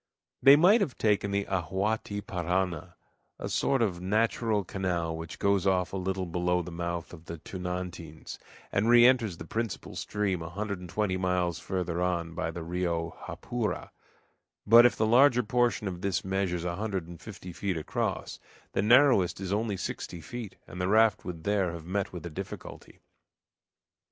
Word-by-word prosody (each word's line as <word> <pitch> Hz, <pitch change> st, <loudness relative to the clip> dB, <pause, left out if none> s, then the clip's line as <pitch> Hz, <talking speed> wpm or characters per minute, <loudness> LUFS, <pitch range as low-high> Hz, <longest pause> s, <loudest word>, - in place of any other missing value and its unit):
They 135 Hz, +2 st, +9 dB
might 190 Hz, +9 st, +6 dB
have 145 Hz, -10 st, -1 dB
taken 105 Hz, -2 st, +2 dB
the 100 Hz, 0 st, 0 dB
Ahuaty 100 Hz, +3 st, -2 dB
Parana, 90 Hz, -1 st, -2 dB, 0.4 s
a -, -, -5 dB
sort 135 Hz, -3 st, +1 dB
of 90 Hz, -5 st, -1 dB
natural 110 Hz, +2 st, +1 dB
canal, 85 Hz, -3 st, -2 dB
which 80 Hz, 0 st, -7 dB
goes 100 Hz, -1 st, +2 dB
off 90 Hz, -1 st, +1 dB
a -, -, -1 dB
little 95 Hz, 0 st, -2 dB
below 90 Hz, +1 st, 0 dB
the 90 Hz, -, -8 dB
mouth 85 Hz, 0 st, -4 dB
of 85 Hz, -1 st, -12 dB
the 85 Hz, -, -6 dB
Tunantins, 90 Hz, -2 st, -6 dB, 0.3 s
and 105 Hz, +3 st, +1 dB
re 120 Hz, 0 st, +8 dB
enters 120 Hz, -8 st, +3 dB
the 80 Hz, -, -8 dB
principal 115 Hz, +3 st, -4 dB
stream 100 Hz, -4 st, -1 dB
a 85 Hz, -, -6 dB
hundred 100 Hz, +1 st, -4 dB
an 90 Hz, -, -9 dB
twenty 95 Hz, 0 st, -1 dB
miles 90 Hz, -2 st, 0 dB
further 90 Hz, -2 st, -2 dB
on 85 Hz, -2 st, -1 dB
by 80 Hz, 0 st, -2 dB
the 85 Hz, 0 st, -6 dB
Rio 85 Hz, -1 st, -2 dB, 0.2 s
Japura; 120 Hz, -3 st, -3 dB, 0.7 s
but 115 Hz, +3 st, +9 dB
if -, -, -2 dB
the 110 Hz, -, +1 dB
larger 125 Hz, +2 st, +5 dB
portion 120 Hz, -1 st, +1 dB
of 90 Hz, -2 st, -5 dB
this 95 Hz, -2 st, -1 dB
measures 95 Hz, -3 st, -1 dB
a 85 Hz, 0 st, -2 dB
hundred 95 Hz, -5 st, -3 dB
and 85 Hz, -1 st, -11 dB
fifty 95 Hz, -4 st, -9 dB
feet 95 Hz, -1 st, -2 dB
across, 80 Hz, -, -3 dB, 0.3 s
the -, -, 0 dB
narrowest 120 Hz, -5 st, +5 dB
is 95 Hz, 0 st, -3 dB
only 105 Hz, -1 st, -1 dB
sixty 90 Hz, -1 st, -5 dB
feet, 115 Hz, +3 st, -7 dB
and 90 Hz, -, -7 dB
the 90 Hz, -, 0 dB
raft 110 Hz, +2 st, +4 dB
would 85 Hz, -3 st, -6 dB
there 100 Hz, -3 st, +1 dB
have 85 Hz, -1 st, -8 dB
met 95 Hz, +2 st, -2 dB
with 90 Hz, -3 st, -8 dB
a 85 Hz, -, -5 dB
difficulty. -, -, -8 dB
95 Hz, 175 wpm, -29 LUFS, 85-105 Hz, 0.7 s, They